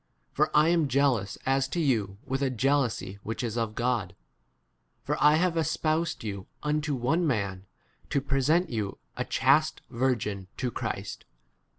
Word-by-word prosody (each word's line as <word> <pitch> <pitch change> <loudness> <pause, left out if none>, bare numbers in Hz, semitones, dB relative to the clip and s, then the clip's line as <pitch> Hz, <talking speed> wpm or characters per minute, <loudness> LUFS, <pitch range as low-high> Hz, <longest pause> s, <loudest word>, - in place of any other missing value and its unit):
For - - +2
I 155 +2 +6
am 170 -3 +3
jealous 130 -7 +1
as 135 0 +2
to 170 - -3
you 110 - +1
with 135 0 -2
a 135 - +2
jealousy 125 -6 0
[whijh 110 +3 -4
is] 115 -2 -2
of 115 -2 -2
God; 120 -7 -1 0.9
for - - -1
I 150 +1 +7
have 175 +2 +2
espousad 160 -1 0
you 100 -3 -5 0.2
unto 150 -1 0
one 160 +8 +1
man, 100 -7 -2 0.4
to 140 - +2
present 140 +6 +1
[you] 105 -4 -3 0.2
a - - -1
chaste - - +2
virgin 115 -6 -1
to 125 -2 -1
3 - - -25
Christ. - - -4
130 Hz, 160 wpm, -28 LUFS, 110-150 Hz, 0.9 s, I